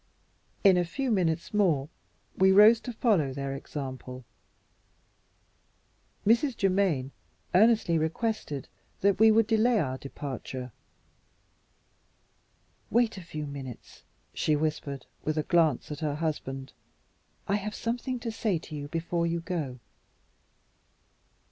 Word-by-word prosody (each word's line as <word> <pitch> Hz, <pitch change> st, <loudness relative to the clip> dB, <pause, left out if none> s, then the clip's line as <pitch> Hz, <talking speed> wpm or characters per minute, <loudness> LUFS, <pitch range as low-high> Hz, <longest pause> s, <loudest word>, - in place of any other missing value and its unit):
In 195 Hz, -3 st, +7 dB
a 175 Hz, -, +3 dB
few 255 Hz, +9 st, -2 dB
minutes 175 Hz, -3 st, 0 dB
more 170 Hz, -10 st, +2 dB, 0.5 s
we 190 Hz, 0 st, +5 dB
rose 210 Hz, +4 st, +8 dB
to 245 Hz, -, -6 dB
follow 200 Hz, -, +1 dB
their 140 Hz, 0 st, -3 dB
example. 130 Hz, -2 st, -7 dB, 2.0 s
Mrs. 235 Hz, +4 st, +3 dB
Germaine 185 Hz, -9 st, +1 dB, 0.4 s
earnestly 210 Hz, -4 st, +4 dB
requested 160 Hz, -, -2 dB, 0.3 s
that 200 Hz, 0 st, +3 dB
we 220 Hz, 0 st, +7 dB
would 220 Hz, 0 st, +5 dB
delay 225 Hz, +1 st, +3 dB
our 130 Hz, -5 st, -2 dB
departure. 130 Hz, -2 st, -6 dB, 2.2 s
"Wait 235 Hz, -1 st, +2 dB
a 190 Hz, -, -7 dB
few 155 Hz, -2 st, -5 dB
minutes," 135 Hz, -4 st, -9 dB, 0.3 s
she 155 Hz, -, +1 dB
whispered, 145 Hz, -3 st, -2 dB, 0.2 s
with 155 Hz, 0 st, -1 dB
a 155 Hz, -, +1 dB
glance 160 Hz, -4 st, +2 dB
at 150 Hz, -, -5 dB
her 150 Hz, -2 st, -1 dB
husband. 135 Hz, -4 st, -4 dB, 0.7 s
"I 200 Hz, -, +2 dB
have 210 Hz, +1 st, -5 dB
something 245 Hz, +2 st, -3 dB
to 230 Hz, -, -3 dB
say 220 Hz, -4 st, 0 dB
to 155 Hz, -1 st, -9 dB
you 145 Hz, -1 st, -5 dB
before 170 Hz, +2 st, -1 dB
you 170 Hz, 0 st, -1 dB
go." 160 Hz, -7 st, -3 dB
165 Hz, 120 wpm, -28 LUFS, 145-215 Hz, 2.2 s, rose